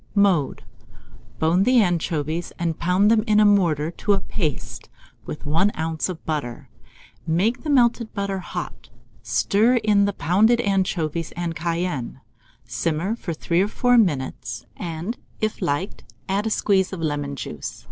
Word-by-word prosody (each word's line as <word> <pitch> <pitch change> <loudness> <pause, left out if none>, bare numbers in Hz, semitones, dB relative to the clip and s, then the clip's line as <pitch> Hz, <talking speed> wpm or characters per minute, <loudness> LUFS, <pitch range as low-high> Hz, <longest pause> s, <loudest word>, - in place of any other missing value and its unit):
Mode. 190 -9 +2 0.7
Bone 165 +4 +2
the 250 +4 +4
anchovies, 170 -3 0
and 165 -2 -2
pound 185 +5 +3
them 220 -2 +4
in 210 -1 +4
a 210 - +6
mortar 170 -7 +3
to 205 +4 0
a 195 - +2
paste, 160 -6 -4 0.4
with 150 - -7
1 165 +7 +2
oz. 160 +2 -2
of 175 -3 -7
butter. 145 -7 -4 0.6
Make 195 +10 +1
the 310 - -5
melted 240 -4 +3
butter 200 -2 -2
hot, 175 -9 -7 0.3
stir 200 - +2
in 210 -3 +3
the 200 - 0
pounded 205 +9 +3
anchovies 180 -6 -1
and 170 -1 -3
cayenne; 165 -6 -2 0.5
simmer 160 - -1
for 195 -7 -5
3 170 +2 0
or 200 - +2
4 245 +3 +2
minutes; 130 - -1
and 170 +7 -5 0.2
if 215 -1 -2
liked, 175 +2 -2 0.2
add 200 +3 0
a - - +1
squeeze 195 -3 +2
of 190 - -5
lemon 145 -3 -2
juice. 75 - -6
175 Hz, 150 wpm, -23 LUFS, 155-205 Hz, 0.7 s, a